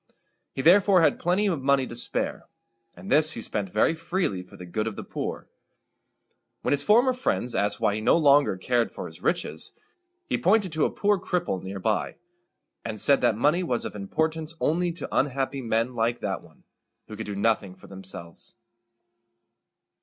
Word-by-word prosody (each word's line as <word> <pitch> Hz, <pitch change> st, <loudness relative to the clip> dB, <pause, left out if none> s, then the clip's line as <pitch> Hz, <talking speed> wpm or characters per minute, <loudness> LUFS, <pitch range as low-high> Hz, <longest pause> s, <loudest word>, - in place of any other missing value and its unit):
He 135 Hz, -, -4 dB
therefore 185 Hz, +2 st, +6 dB
had 160 Hz, -, +3 dB
plenty 180 Hz, +4 st, +1 dB
of 170 Hz, -9 st, 0 dB
money 135 Hz, 0 st, +2 dB
to 120 Hz, -, -8 dB
spare, 120 Hz, -, -2 dB, 0.5 s
and 195 Hz, -, -9 dB
this 155 Hz, +1 st, +4 dB
he 115 Hz, -, -6 dB
spent 100 Hz, -3 st, -3 dB
very 105 Hz, -, +2 dB
freely 165 Hz, -, -2 dB
for 90 Hz, -, -15 dB
the 90 Hz, -, -9 dB
good 110 Hz, +5 st, -2 dB
of 110 Hz, -, -4 dB
the -, -, -6 dB
poor. -, -, -5 dB, 1.2 s
When -, -, 0 dB
his 145 Hz, -1 st, +2 dB
former 240 Hz, -, +4 dB
friends 185 Hz, -, -1 dB
asked 100 Hz, 0 st, +2 dB
why 105 Hz, -, +2 dB
he 110 Hz, -, -3 dB
no 110 Hz, -, +4 dB
longer 145 Hz, -, +4 dB
cared 120 Hz, +5 st, 0 dB
for -, -, -7 dB
his -, -, -11 dB
riches, -, -, -1 dB, 0.5 s
he -, -, -1 dB
pointed 195 Hz, 0 st, +2 dB
to 155 Hz, -1 st, +1 dB
a -, -, +1 dB
poor 205 Hz, -1 st, +1 dB
cripple 175 Hz, -, -2 dB
near 95 Hz, +1 st, -6 dB
by, 105 Hz, +3 st, -1 dB, 0.7 s
and 110 Hz, -2 st, -5 dB
said 140 Hz, +5 st, +4 dB
that 105 Hz, -, +2 dB
money 150 Hz, +9 st, +2 dB
was 125 Hz, -9 st, -1 dB
of -, -, -5 dB
importance 155 Hz, +10 st, -2 dB
only 175 Hz, +3 st, +1 dB
to 170 Hz, -, -5 dB
unhappy 135 Hz, 0 st, 0 dB
men 115 Hz, +1 st, 0 dB
like 120 Hz, 0 st, 0 dB
that 95 Hz, -2 st, -3 dB
one, 80 Hz, -2 st, -21 dB, 0.4 s
who 110 Hz, -, -8 dB
could 110 Hz, 0 st, -6 dB
do 100 Hz, -, -4 dB
nothing 100 Hz, -2 st, 0 dB
for 95 Hz, -, -17 dB
themselves. 95 Hz, -3 st, -9 dB
130 Hz, 185 wpm, -26 LUFS, 105-165 Hz, 1.2 s, therefore